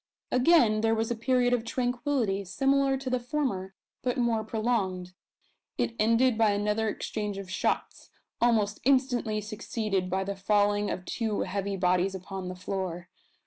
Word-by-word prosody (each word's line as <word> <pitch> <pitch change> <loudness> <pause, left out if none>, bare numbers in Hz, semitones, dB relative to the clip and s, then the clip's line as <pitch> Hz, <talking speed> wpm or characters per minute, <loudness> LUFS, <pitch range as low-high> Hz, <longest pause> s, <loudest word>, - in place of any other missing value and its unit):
Again 250 -5 +4
there 225 0 +2
was 225 +1 -1
a - - 0
period 245 +1 +2
of 240 -2 +1
tranquillity 245 -4 -1
similar 270 +7 +2
to 265 0 -9
the 255 -1 +1
former, 240 -8 -2 0.3
but 250 -1 -1
more 235 -3 +1
prolonged. 215 -5 -1 0.6
It 230 - -1
ended 230 +2 +3
by 215 -2 +4
another 210 +2 0
exchange 210 -1 -4
of 195 -1 -7
shots, - - -2 0.3
almost 215 -4 +2
instantly 245 -5 +2
succeeded 210 -3 -2
by 190 +1 0
the 200 +1 -4
falling 205 +1 +2
of 180 - -4
two 220 0 -2
heavy 195 +1 -2
bodies 180 +1 +2
upon 190 0 -6
the 185 - -6
floor. 180 -1 -4
215 Hz, 150 wpm, -28 LUFS, 195-245 Hz, 0.6 s, Again